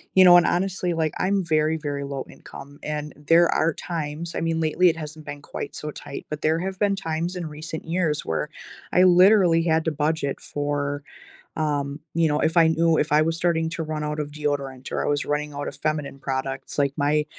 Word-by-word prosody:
you 190 0 +8
know, 175 -1 +9
and 175 -1 +6
honestly, 180 -1 0
like, 160 -2 0
I'm 195 +1 +1
very, 155 -1 +2
very 145 -2 -4
low 140 -1 -5
income, 140 +1 -12
and 150 0 -4
there 165 +3 +4
are 165 +1 +2
times- 165 0 -5
I - - -2
mean, 165 0 0
lately, 165 +3 +3
it 165 - -2
hasn't 155 0 -8
been 145 0 -7
quite 145 - -7
so 150 - -5
tight- 140 - -8
but 150 0 -5
there 160 +1 +2
have 190 +2 -4
been 200 0 +1
times 165 +1 -3
in 175 -2 -4
recent 155 +1 -7
years 165 -3 0
where 80 - -2 0.4
I 180 - +5
literally 180 -1 +6
had 160 -1 +1
to 160 - +1
budget 150 -1 -1
for, 145 0 -2 0.5
um, 145 -2 -1 0.2
you 165 -1 +3
know, 150 -1 +1
if 160 +2 +1
I 165 -1 +7
knew 160 0 +3
if 150 - 0
I 150 +1 +5
was 165 +1 0
starting 165 -2 +1
to 165 - -3
run 155 -1 -3
out 150 0 -3
of 145 -1 -4
deodorant 140 -3 -3
or - - -1
I - - 0
was 145 0 0
running 150 0 -2
out 145 0 -4
of - - -6
feminine 150 -2 -2
products, 135 -1 -4
like 140 -1 +2
my 150 +1 +2
155 Hz, 215 wpm, -24 LUFS, 145-165 Hz, 0.5 s, know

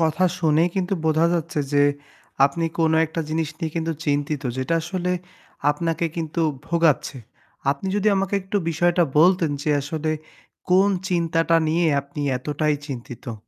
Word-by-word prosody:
কথা 165 +3 +2
শুনেই 160 +1 +3
কিন্তু 190 +1 0
বোঝা 160 +1 +3
যাচ্ছে 155 -2 -1
যে, 145 0 +4 0.6
আপনি 155 +4 0
কোন 160 -1 +3
একটা 165 +1 -4
জিনিস 160 -1 -1
নিয়ে 160 -3 -3
কিন্তু 165 0 -1
চিন্তিত 145 0 -1
যেটা 130 +6 -1
আসলে 180 +1 -2 0.6
আপনাকে 165 +2 -1
কিন্তু 165 0 -2 0.3
ভোগাচ্ছে। 165 -5 +1 0.5
আপনি 145 +7 -3
যদি 210 +1 +2
আমাকে 195 +1 -1
একটু 190 +2 -3
বিষয়টা 175 +2 +2 0.2
বলতেন 175 -1 +4
যে, 155 - 0
আসলে 155 +2 -3 0.6
কোন 190 +2 +5 0.2
চিন্তাটা 165 -2 +2
নিয়ে 165 +1 +2
আপনি 140 +2 -9 0.2
এতটাই 150 +3 -1
চিন্তিত? 120 -3 -7
165 Hz, 140 wpm, -23 LUFS, 150-175 Hz, 0.6 s, কোন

